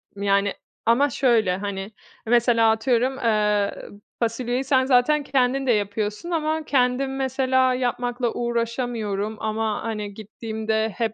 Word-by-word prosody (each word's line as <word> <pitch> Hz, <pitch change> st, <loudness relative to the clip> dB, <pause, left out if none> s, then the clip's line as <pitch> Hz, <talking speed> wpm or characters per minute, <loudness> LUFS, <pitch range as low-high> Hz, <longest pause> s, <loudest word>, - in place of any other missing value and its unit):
Yani, 200 Hz, 0 st, +1 dB, 0.3 s
ama 260 Hz, +5 st, +4 dB
şöyle, 225 Hz, -8 st, +2 dB
hani, 200 Hz, 0 st, -5 dB, 0.3 s
mesela 230 Hz, -1 st, +4 dB
atıyorum, 250 Hz, +3 st, +1 dB
ııı, 210 Hz, -3 st, 0 dB, 0.2 s
fasulyeyi 245 Hz, +2 st, -1 dB
sen 260 Hz, -1 st, +2 dB
zaten 275 Hz, +3 st, +3 dB
kendin 270 Hz, 0 st, +1 dB
de -, -, +4 dB
yapıyorsun 210 Hz, -, -2 dB
ama 315 Hz, -1 st, -1 dB
"Kendim 265 Hz, 0 st, +1 dB
mesela 260 Hz, -1 st, +1 dB
yapmakla 245 Hz, -1 st, -1 dB
uğraşamıyorum 230 Hz, -3 st, -2 dB
ama, 220 Hz, 0 st, -2 dB
hani, 210 Hz, -3 st, -4 dB
gittiğimde 220 Hz, +1 st, -3 dB
hep 225 Hz, -2 st, -1 dB
235 Hz, 120 wpm, -23 LUFS, 215-260 Hz, 0.3 s, ama